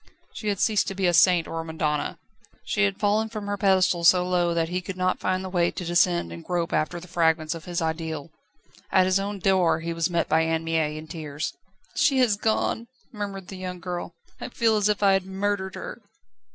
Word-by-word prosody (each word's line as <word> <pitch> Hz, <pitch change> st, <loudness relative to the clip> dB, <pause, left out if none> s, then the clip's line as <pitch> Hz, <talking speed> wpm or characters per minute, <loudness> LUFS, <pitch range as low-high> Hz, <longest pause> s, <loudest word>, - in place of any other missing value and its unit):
She 215 Hz, -, -6 dB
had 200 Hz, -2 st, 0 dB
ceased 215 Hz, -3 st, +2 dB
to 195 Hz, -, -3 dB
be 190 Hz, 0 st, 0 dB
a 175 Hz, -, +3 dB
saint 175 Hz, -1 st, +5 dB
or 165 Hz, -, -4 dB
a -, -, -7 dB
madonna; 155 Hz, -2 st, -2 dB, 0.5 s
she 100 Hz, -, +2 dB
had 100 Hz, -, -2 dB
fallen 215 Hz, +2 st, +1 dB
from 215 Hz, -2 st, -6 dB
her 205 Hz, 0 st, -1 dB
pedestal 190 Hz, -3 st, +2 dB
so 180 Hz, +1 st, +5 dB
low 175 Hz, -1 st, +2 dB
that 165 Hz, -1 st, 0 dB
he 180 Hz, +1 st, -2 dB
could 185 Hz, 0 st, -7 dB
not 185 Hz, 0 st, 0 dB
find 185 Hz, 0 st, -1 dB
the -, -, -3 dB
way 175 Hz, -2 st, +2 dB
to 180 Hz, -, -6 dB
descend 175 Hz, -, +2 dB
and 85 Hz, 0 st, -8 dB
grope 175 Hz, -2 st, -2 dB
after 170 Hz, +3 st, 0 dB
the 180 Hz, -, -12 dB
fragments 160 Hz, -2 st, +1 dB
of 165 Hz, -2 st, -9 dB
his 175 Hz, -2 st, -2 dB
ideal. 160 Hz, -1 st, -3 dB, 0.6 s
At 185 Hz, -1 st, +5 dB
his 185 Hz, +1 st, +2 dB
own 200 Hz, +1 st, -3 dB
door 185 Hz, -3 st, +2 dB
he 170 Hz, 0 st, -3 dB
was 165 Hz, 0 st, 0 dB
met 170 Hz, -1 st, 0 dB
by 160 Hz, +1 st, +3 dB
Anne 160 Hz, 0 st, 0 dB
Mie 160 Hz, -2 st, 0 dB
in 155 Hz, -, -7 dB
tears. 155 Hz, -2 st, -5 dB, 0.4 s
"She 290 Hz, -2 st, +3 dB
has 245 Hz, -5 st, +4 dB
gone," 225 Hz, +2 st, 0 dB, 0.3 s
murmured 200 Hz, -3 st, -6 dB
the 190 Hz, -, -7 dB
young 180 Hz, -1 st, -6 dB
girl. 175 Hz, -1 st, -5 dB, 0.2 s
"I -, -, -6 dB
feel 225 Hz, -2 st, +2 dB
as 210 Hz, 0 st, +2 dB
if 210 Hz, 0 st, 0 dB
I 200 Hz, -, +6 dB
had 195 Hz, -1 st, 0 dB
murdered 190 Hz, 0 st, -2 dB
her." -, -, -7 dB
180 Hz, 225 wpm, -25 LUFS, 165-195 Hz, 0.6 s, I